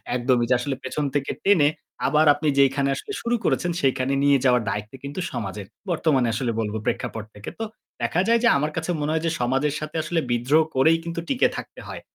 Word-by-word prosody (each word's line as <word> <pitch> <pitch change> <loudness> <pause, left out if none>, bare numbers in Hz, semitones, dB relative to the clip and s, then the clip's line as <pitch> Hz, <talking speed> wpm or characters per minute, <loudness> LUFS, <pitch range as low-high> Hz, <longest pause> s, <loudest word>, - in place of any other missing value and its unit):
একদমই। 120 -1 +2
যে - - +5
আসলে 135 +2 -2
পেছন 145 +3 -2
থেকে 140 -1 0
টেনে 175 -8 +5 0.4
আবার 150 +3 +4
আপনি 150 +2 -3
যেইখানে 140 0 +3
আসলে 415 - -7
শুরু 235 0 0
করেছেন 175 - +1
সেইখানে 135 0 +1
নিয়ে 140 -1 +5
যাওয়ার 125 -2 +4
দায়িত্ব 105 +4 -4
কিন্তু 140 +6 -5
সমাজের। 100 -4 -5 0.2
বর্তমানে 150 -7 +2
আসলে 120 0 -1
বলবো 110 0 -2
প্রেক্ষাপট 110 - -2
থেকে। 105 - -7
তো - - -1 0.4
দেখা 160 +10 +1
যায় 230 0 +4
যে - - +5
আমার 150 +2 -1
কাছে 160 +2 -1
মনে 150 +1 -1
হয় 160 0 -1
যে - - +1
সমাজের 135 +4 +1
সাথে 155 +1 -7
আসলে 165 +1 0
বিদ্রোহ 130 +7 +3
করেই 160 +5 +5
কিন্তু 170 0 -4
টিকে 265 - +3
থাকতে - - -8
হয়। - - -7
140 Hz, 205 wpm, -24 LUFS, 125-160 Hz, 0.4 s, যে